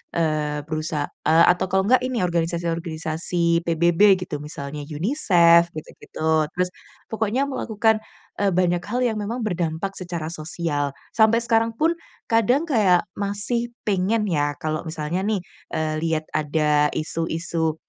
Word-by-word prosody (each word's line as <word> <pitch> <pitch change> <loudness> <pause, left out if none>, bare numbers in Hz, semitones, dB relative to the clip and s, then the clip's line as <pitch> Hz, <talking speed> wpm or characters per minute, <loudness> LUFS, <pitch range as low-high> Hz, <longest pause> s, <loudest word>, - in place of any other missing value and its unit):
eee, 150 -2 0
perusahaa 155 -2 -2 0.2
atau 170 +3 +5
kalau 190 0 +3
enggak 255 +2 +5
ini 245 -7 -1
organisasi-organisasi 170 0 -1
PBB 170 +4 +5
gitu, 175 - -4
misalnya 150 -1 -7
UNICEF 170 - +4
gitu-gitu, 155 0 -2
terus 180 0 0 0.4
pokoknya 220 +4 0
melakukan, 220 -4 +1 0.4
eee, 200 -1 +2
banyak 175 -1 +2
hal 240 +4 -1
yang 225 -3 0
memang 230 +4 -3
berdampak 175 -1 -2
secara 170 -3 -4
sosial, 155 -3 -3 0.2
sampai 220 +1 +5
sekarang 230 -1 +2
pun 320 +7 +2 0.4
kadang 230 +6 +3
kayak 195 -9 +4
masih 215 +4 -2
pengen 210 +2 +1
ya 145 -3 +1
kalau 155 0 -2
misalnya 160 +3 -3
nih, 210 -1 +1 0.3
eee, 155 -1 -1
lihat 160 -1 0
ada 150 -1 +2
isu-isu 160 0 -2
170 Hz, 130 wpm, -23 LUFS, 155-210 Hz, 0.4 s, atau